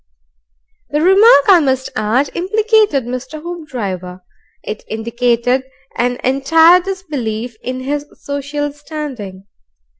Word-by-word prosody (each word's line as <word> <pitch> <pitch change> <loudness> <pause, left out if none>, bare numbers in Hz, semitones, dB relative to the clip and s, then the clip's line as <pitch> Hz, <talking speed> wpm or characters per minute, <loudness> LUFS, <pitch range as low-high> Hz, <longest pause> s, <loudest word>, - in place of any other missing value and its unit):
The 295 - 0
remark, 385 -1 +6
I 375 -3 +7
must 265 -3 -1
add, 240 +6 0
implicated 420 - +2
Mr. 255 +5 -6
Hoopdriver. 230 - -6 0.4
It 215 - -6
indicated 235 +3 0 0.3
an 245 +1 0
entire 320 +7 +5
disbelief 275 - -4
in 255 0 -4
his 290 +2 -3
social 285 +1 -3
standing. 270 -11 -7
275 Hz, 100 wpm, -16 LUFS, 240-320 Hz, 0.4 s, I